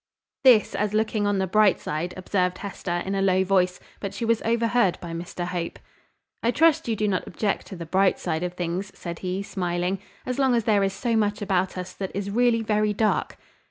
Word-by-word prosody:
"This 245 -5 +6
as 210 0 -1
looking 215 -1 +1
on 205 -1 +1
the 190 - +1
bright 205 0 +4
side," 160 +4 -3
observed 185 -1 0
Hester, 175 -3 -4
in 195 - -2
a 195 - 0
low 190 -1 +3
voice; 185 -1 +2 0.2
but 200 -1 -5
she 230 - -2
was 230 0 +2
overheard 230 -3 +2
by 170 - -7
Mr 175 +1 -5
Hope. 175 -1 -4 0.6
"I 230 - +1
trust 325 +3 +3
you 225 - +1
do 210 0 0
not 190 -3 -1
object 200 +3 -2
to 195 - -8
the 170 -2 -7
bright 190 +4 +2
side 160 0 -2
of 180 0 -3
things," 180 +3 -3
said 170 -1 -6
he, 185 +1 -3
smiling, 180 -1 -2 0.3
"as 255 +1 -3
long 265 -3 +3
as 230 - +1
there 210 -2 +3
is 195 0 0
so 235 +3 -1
much 210 -1 +1
about 190 -2 0
us 180 0 -5
that 190 -1 -4
is 200 0 -3
really 235 0 +3
very 210 -1 +1
dark?" 215 +1 0
195 Hz, 215 wpm, -25 LUFS, 180-215 Hz, 0.6 s, This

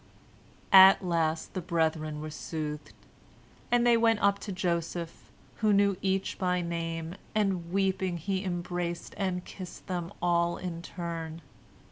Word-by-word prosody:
At 190 0 +9
last 165 -2 0
the 185 - -3
brethren 160 -3 -1
were 155 0 -6
soothed, 150 -1 -5 0.8
and 240 0 +4
they 240 -1 +6
went 225 -1 +3
up 200 0 +3
to 205 - -6
Joseph, 170 -2 -3 0.3
who 215 -2 +2
knew 200 -1 +4
each 190 0 -1
by 180 -2 +1
name, 165 -1 -3 0.2
and, 190 -5 0
weeping, 190 -2 0
he 190 +3 -2
embraced 175 -1 -3
and 185 -3 -2
kissed 185 -2 -9
them 175 -2 -3
all 170 0 +1
in 175 -2 -5
turn. 165 -2 -6
175 Hz, 135 wpm, -29 LUFS, 165-190 Hz, 0.8 s, At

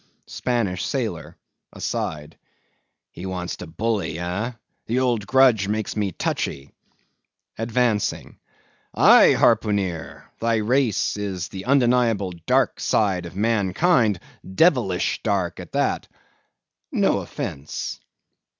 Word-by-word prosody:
SPANISH 115 -7 -2
SAILOR. - - -3 0.4
(Aside.) 75 +1 -4 0.8
He 90 +3 -7
wants 90 -1 -4
to 90 - -8
bully, 95 -1 -2
ah!—the 110 +6 -5
old 120 -5 0
grudge 125 -6 +4
makes 110 +1 -2
me 105 -3 -1
touchy 70 -3 -3 0.8
(Advancing.) 115 -2 -1 0.6
Aye, - - +7
harpooneer, 100 -9 +1 0.2
thy 115 0 +1
race 115 0 +1
is 95 -3 -4
the 95 -1 -8
undeniable 120 -7 +2 0.2
dark - - +2
side 95 -5 +1
of 85 - -12
mankind—devilish 110 - +1
dark 95 -5 -1
at - - -10
that. - - 0 0.8
No - - +2
offence. 70 +2 -5
105 Hz, 95 wpm, -23 LUFS, 90-115 Hz, 0.8 s, Aye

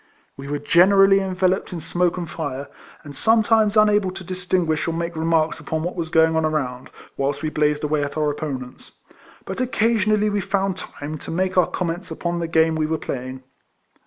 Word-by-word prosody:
We 135 0 -9
were 145 +1 -2
generally 195 +6 +5
enveloped 190 -1 0
in 175 - -4
smoke 175 +2 0
and 175 -2 -4
fire, 145 -4 -5 0.3
and 145 -1 -10
sometimes 220 - +3
unable 210 -2 +4
to 185 +1 -8
distinguish 180 -3 -1
or 165 - -1
make 170 0 -3
remarks 160 0 +1
upon 160 +1 -3
what 175 - -3
was 165 -3 -3
going 160 0 +3
on 160 - +2
around, 135 -5 -2 0.3
whilst 140 +2 -1
we 155 - -1
blazed 150 0 +1
away 150 -1 0
at 145 +1 -5
our 150 -1 +1
opponents; 135 -4 -7 0.5
but - - -4
occasionally 215 -4 +1
we 205 0 0
found 195 -1 -1
time 155 -4 -7
to - - -10
make 185 +2 -1
our 180 - +4
comments 180 +1 -3
upon 170 +1 -3
the 170 - -2
game 160 0 +3
we 155 -1 0
were 160 0 -1
playing. 130 -2 -6
165 Hz, 190 wpm, -22 LUFS, 150-190 Hz, 0.5 s, generally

